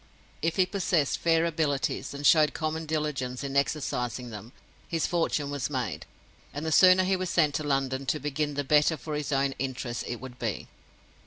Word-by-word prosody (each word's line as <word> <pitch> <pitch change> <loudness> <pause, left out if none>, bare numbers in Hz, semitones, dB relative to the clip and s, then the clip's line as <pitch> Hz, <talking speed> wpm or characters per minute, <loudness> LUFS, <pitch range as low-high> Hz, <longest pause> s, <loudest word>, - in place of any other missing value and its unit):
If 165 +1 0
he 185 - +4
possessed 180 -6 0
fair 165 0 +3
abilities 155 -3 -1
and 140 +1 -6
showed 150 -1 +5
common 160 0 -3
diligence 145 -5 -2
in 140 0 -4
exercising 125 -4 -1
them, 110 +2 -9 0.4
his 165 -2 0
fortune 155 -4 0
was 145 -2 -2
made; 125 -8 -3 0.5
and 145 +2 -4
the 160 - -1
sooner 185 +3 +7
he 190 +1 +2
was 185 -1 -3
sent 155 -4 +2
to - - -4
London 135 -2 -1
to 150 - 0
begin 150 +1 -2
the 145 - -1
better 150 +3 +3
for 150 +4 -6
his 150 -1 -3
own 135 0 +1
interests 125 -2 -3
it 120 - -3
would 125 +1 -10
be. 110 -5 -3
145 Hz, 185 wpm, -28 LUFS, 135-160 Hz, 0.5 s, sooner